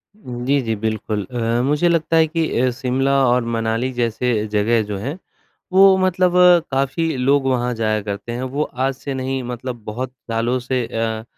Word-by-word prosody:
जी, 130 - -2
जी, 115 -3 -2
बिल्कुल 110 -1 -2
अ, 115 +2 -1
मुझे 150 +5 +2
लगता 165 -1 +1
है 160 0 +5
कि 165 0 -1
अ, 130 - +3
शिमला 130 +2 0
और 120 0 +2
मनाली 115 +3 -1
जैसे 120 -2 0
जगह 105 +2 +1
जो 100 - -3
हैं, 135 - -5 0.6
वो 190 0 +7
मतलब 185 -1 +2 0.4
काफ़ी 140 +5 0
लोग 135 +2 +2
वहाँ 125 -1 0
जाया 110 -1 0
करते 100 +3 -5
हैं। 120 +2 -4
वो 135 +3 -2
आज 135 -1 -2
से 140 +1 -6
नहीं, 130 0 -2
मतलब 120 -1 -6
बहुत 125 +4 -4 0.2
सालों 115 +3 0
से 125 -1 -2
अ, 110 -1 -2
125 Hz, 175 wpm, -20 LUFS, 115-140 Hz, 0.6 s, वो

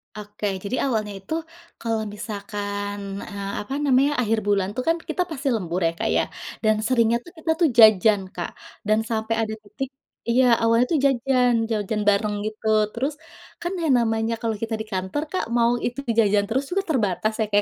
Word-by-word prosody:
Oke, 210 0 -7 0.2
jadi 200 +5 -2
awalnya 215 -4 -1
itu 195 +11 -6 0.5
kalau 225 -1 -1
misalkan, 205 -1 -4 0.3
eee, 200 -1 -5
apa 210 +6 -6
namanya, 275 +1 +4
akhir 225 -1 +1
bulan 195 -2 +2
itu 255 - -2
kan 330 - +3
kita - - 0
pasti 285 -2 -4
lembur 180 -4 -2
ya - - +1
Kak - - 0
ya. - - +3 0.4
Dan 215 0 +4
seringnya 235 -2 +3
tuh 345 - -12
kita 320 0 -1
tuh 335 - +4
jajan 215 -2 +7
Kak, 175 - -4 0.4
dan 215 0 +4
sampai 220 0 -1
ada 220 -1 -2
titik 270 +5 -5 0.4
iya 250 +2 +4 0.2
awalnya 230 +2 +4
tuh 320 - +3
jajan 250 -2 +3 0.2
jajan 210 0 -1
bareng 205 +1 +1
gitu, 215 0 -5 0.2
terus 265 +7 -2 0.5
kan 345 - -2 0.3
namanya 225 0 0
kalau 225 -1 -1
kita 225 0 -2
di - - -2
kantor 190 +10 -2
Kak 370 - -1
mau 235 0 +4
itu 245 +3 -3 0.2
jajan 205 -2 +4
terus 265 +4 0
juga 390 +2 0
terbatas 215 - +1
ya 220 - +2
Kak 205 - -2
220 Hz, 180 wpm, -24 LUFS, 205-250 Hz, 0.5 s, jajan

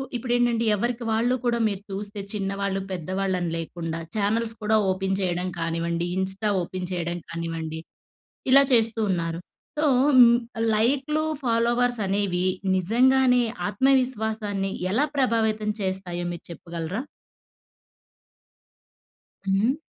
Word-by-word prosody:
ఇప్పుడేంటంటే 240 -1 +1
ఎవరికి 240 +3 -2
వాళ్ళు 235 +3 +2
కూడా 235 -1 +1
మీరు 200 -2 -3
చూస్తే 205 +1 -5
చిన్నవాళ్ళు, 195 -1 -2
పెద్దవాళ్ళని 185 0 -2
లేకుండా, 165 0 -4 0.2
చానెల్స్ 220 +2 0
కూడా 220 +1 +3 0.2
ఓపెన్ 190 0 -1
చేయడం 180 0 -1
కానివ్వండి, 170 +1 -1
ఇన్‌స్టా 190 +3 -1
ఓపెన్ 180 +1 -5
చేయడం 175 -1 -2
కానివ్వండి, 165 -1 -4 0.7
ఇలా 275 +2 +8
చేస్తూ 225 -1 +4
ఉన్నారు. 165 -2 -1 0.4
సో 305 - +2 0.3
హ్మ్. 235 -1 +8 0.4
లైకులు 275 +7 +1 0.2
ఫాలోవర్స్ 240 0 +2
అనేవి 190 -2 0 0.3
నిజంగానే 250 +6 +4 0.3
ఆత్మవిశ్వాసాన్ని 220 -4 +1 0.2
ఎలా 260 +8 +3
ప్రభావితం 220 -5 +1
చేస్తాయో 185 -2 -2
మీరు 170 - -9
చెప్పగలరా? 170 +4 -5 2.5
హ్మ్. 200 +7 +2
205 Hz, 105 wpm, -25 LUFS, 180-235 Hz, 2.5 s, ఇలా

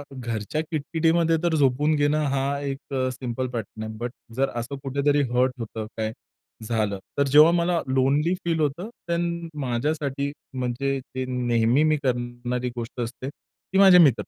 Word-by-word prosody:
घरच्या 115 +3 -3
किटकिटीमध्ये 165 +2 +2
तर 170 -2 +2
झोपून 145 +2 +3
घेणं 150 +1 +2
हा 140 +1 0
एक 140 0 -5
अ, 130 -1 +1
सिंपल 125 0 -3
पॅटर्न 110 -2 -5
आहे 110 0 -5
बट 120 +2 -4 0.2
जर 135 +2 +1
असं 140 +4 -5
कुठेतरी 140 +2 +2
हर्ट 125 +1 +3
होतं, 110 -1 -5
काय 110 -1 -1 0.5
झालं, 110 -3 -1 0.2
तर 140 - +4
जेव्हा 150 +4 +7
मला 170 0 +2
लोनली 135 +6 +2
फील 165 -1 +1
होतं 155 +8 -1 0.2
देन 170 0 -1
माझ्यासाठी 140 +2 -1 0.2
म्हणजे 130 +2 -1 0.2
ते 130 - -1
नेहमी 125 +1 +2
मी 155 -1 +3
करणारी 120 0 -2
गोष्ट 120 +1 -6
असते, 125 +3 -4
ती 190 +5 -8
माझे 190 -2 +9
मित्र. 155 -7 +7
135 Hz, 155 wpm, -25 LUFS, 120-155 Hz, 0.5 s, माझे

